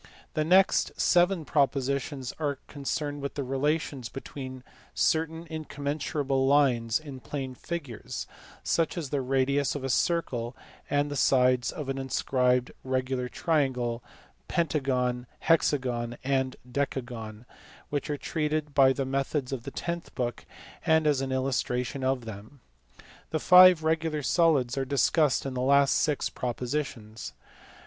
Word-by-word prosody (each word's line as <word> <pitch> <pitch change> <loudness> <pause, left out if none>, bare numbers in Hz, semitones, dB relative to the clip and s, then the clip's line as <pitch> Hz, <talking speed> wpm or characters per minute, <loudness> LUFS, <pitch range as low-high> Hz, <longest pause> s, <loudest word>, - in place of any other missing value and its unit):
The 155 - +1
next 185 +5 +3
seven 175 -2 +3
propositions 140 -2 0
are 145 -3 -1
concerned 145 0 -3
with 140 - -4
the 140 - -2
relations 135 -1 -1
between 130 -2 -8 0.3
certain 160 +1 +1
incommensurable 145 -3 -2
lines 125 -5 +3
in 145 -4 -9
plane 135 0 -5
figures 140 -4 -6 0.4
(such 165 +1 0
as 155 -6 -4
the 145 - 0
radius 135 +2 +1
of 145 - -4
a 135 - -2
circle 125 -7 0 0.3
and 145 0 +1
the - - -3
sides 125 -2 +3
of 150 -5 -6
an 135 0 -2
inscribed 125 -1 +1
regular 130 -1 -1
triangle, 125 -8 0 0.4
pentagon, 130 -6 0
hexagon, 125 -7 +1
and 130 -1 0
decagon) 120 -4 -4 0.5
which 145 0 -2
are 145 - -1
treated 150 -1 -2
by 135 -1 +6
the 135 0 -2
methods 135 0 -1
of 120 -3 -5
the - - -3
tenth 170 0 -5
book 120 -2 -3 0.4
and 160 0 +3
as 145 -3 +3
an 135 -1 -3
illustration 130 0 -1
of 130 -2 0
them. 110 +6 -10 0.7
The 155 - -1
five 180 -1 +8
regular 160 -1 0
solids 140 -6 +2
are - - +1
discussed 140 +2 +2
in 135 - -3
the 125 - -2
last 140 +1 +4
six 150 -3 +1
propositions. 120 -3 -4
135 Hz, 135 wpm, -28 LUFS, 125-150 Hz, 0.7 s, five